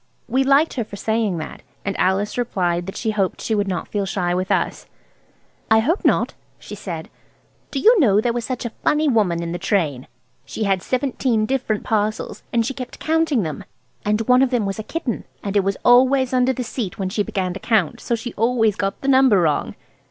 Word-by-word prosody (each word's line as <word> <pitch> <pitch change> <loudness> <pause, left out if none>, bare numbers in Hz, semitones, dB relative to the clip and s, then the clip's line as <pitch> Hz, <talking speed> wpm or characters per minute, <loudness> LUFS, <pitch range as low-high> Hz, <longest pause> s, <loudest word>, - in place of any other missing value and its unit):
We 265 +2 +2
liked 275 +4 +3
her 240 - -1
for 205 - -10
saying 220 -3 0
that, 155 - -7 0.2
and 200 - -2
Alice 195 +3 +1
replied 180 -7 -1
that 195 - -6
she 220 - -1
hoped 195 -3 -1
she 225 - -2
would 205 -1 +1
not 180 -3 -3
feel 200 -2 -2
shy 180 -2 -1
with 185 +1 -1
us. - - -1 0.8
"I 220 - +6
hope 300 - +1
not," - - +2 0.2
she - - -11
said. 175 -6 -6 0.6
"Do - - -5
you 450 - +6
know, 210 - +4
there 235 +2 +1
was 240 0 -2
such 250 0 -4
a 235 - -3
funny 300 +1 +2
woman 200 -10 +2
in 170 - -4
the 175 - -4
train? 155 - -1 0.4
She 220 - -5
had 195 -2 +1
seventeen 250 -2 0
different 235 -4 -1
parcels, 215 0 -1
and 230 -1 +2
she 270 - -2
kept 255 -1 -7
counting 315 -7 +1
them, 155 -4 -5 0.4
and 210 +1 +1
one 250 +3 +4
of 265 - +3
them 245 -5 0
was 195 +1 -3
a - - -3
kitten, 280 -3 -3 0.2
and 200 0 -3
it 200 - +4
was 195 0 -1
always 260 +1 +5
under 255 0 +3
the 255 0 -3
seat 225 -5 -4
when 190 -2 -2
she 205 +2 -1
began 185 -3 -2
to 195 - -7
count, 210 -9 +1
so 235 - 0
she 230 +1 -6
always 225 -2 +2
got 195 -3 -2
the 275 - -4
number 260 -6 +5
wrong." 155 -4 0
220 Hz, 215 wpm, -21 LUFS, 195-250 Hz, 0.8 s, I